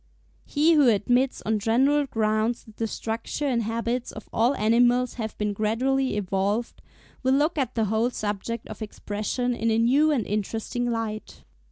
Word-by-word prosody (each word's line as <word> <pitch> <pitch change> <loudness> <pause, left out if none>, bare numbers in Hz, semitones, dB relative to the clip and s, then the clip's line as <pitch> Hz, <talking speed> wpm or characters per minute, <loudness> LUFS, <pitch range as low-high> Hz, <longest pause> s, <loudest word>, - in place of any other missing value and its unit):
He 315 +3 +3
who 295 -4 +5
admits 245 +5 +1
on 220 0 +1
general 270 +7 +2
grounds 220 0 0
that 220 -1 -17
the 225 - -1
structure 225 +6 -4
and 250 -4 +1
habits 230 +2 -2
of 215 - -10
all 240 +5 +2
animals 245 +3 +3
have 220 -1 -5
been 210 -1 -1
gradually 245 +4 0
evolved, 200 +3 -1 0.4
will 260 0 +3
look 300 +4 +2
at 260 -5 -2
the 225 -2 +1
whole 220 +3 +1
subject 215 0 -4
of - - -9
Expression 215 +4 -3
in 230 -1 -1
a 220 - +2
new 265 +7 +4
and 270 -8 +1
interesting 225 +4 -2
light. 225 -2 -4
230 Hz, 165 wpm, -25 LUFS, 215-255 Hz, 0.4 s, who